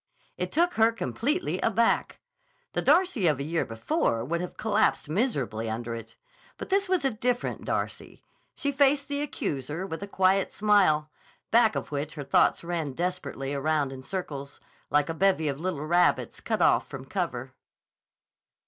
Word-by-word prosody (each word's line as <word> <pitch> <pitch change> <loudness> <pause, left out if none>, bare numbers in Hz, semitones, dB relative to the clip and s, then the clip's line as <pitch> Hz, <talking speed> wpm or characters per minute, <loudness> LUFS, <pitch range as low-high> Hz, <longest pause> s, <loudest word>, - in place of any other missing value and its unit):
It - - -3
took 345 +2 +2
her 225 +1 +4
completely 280 +8 -2
aback. - - +1 0.5
The - - 0
Darcy 300 - +3
of 150 -4 +2
a - - -2
year 165 +3 -1
before 115 0 -1
would 170 +5 -1
have 180 - -6
collapsed 215 -6 +1
miserably 135 - -1
under 115 +1 -4
it. 115 -1 -8 0.4
But - - -7
this 390 0 +2
was 370 -6 +1
a 270 - +3
different 245 +2 -2
Darcy. - - -4 0.3
She 285 - -1
faced 280 0 +3
the 285 0 -1
accuser 150 - -3
with 165 -2 -6
a 200 - -5
quiet 190 0 +2
smile, 190 -8 +3 0.4
back 225 -1 +5
of - - -4
which 145 +1 -3
her 145 - -5
thoughts 140 - +3
ran 165 -5 -3
desperately 175 -5 -3
around 145 -1 0
in 130 - -8
circles, 140 -4 -5 0.3
like 145 0 +2
a 165 - -2
bevy 175 -2 +2
of 140 -1 -2
little 165 -4 -3
rabbits 175 +2 +2
cut - - 0
off - - +3
from - - -8
cover. - - -3
175 Hz, 165 wpm, -27 LUFS, 145-230 Hz, 0.5 s, back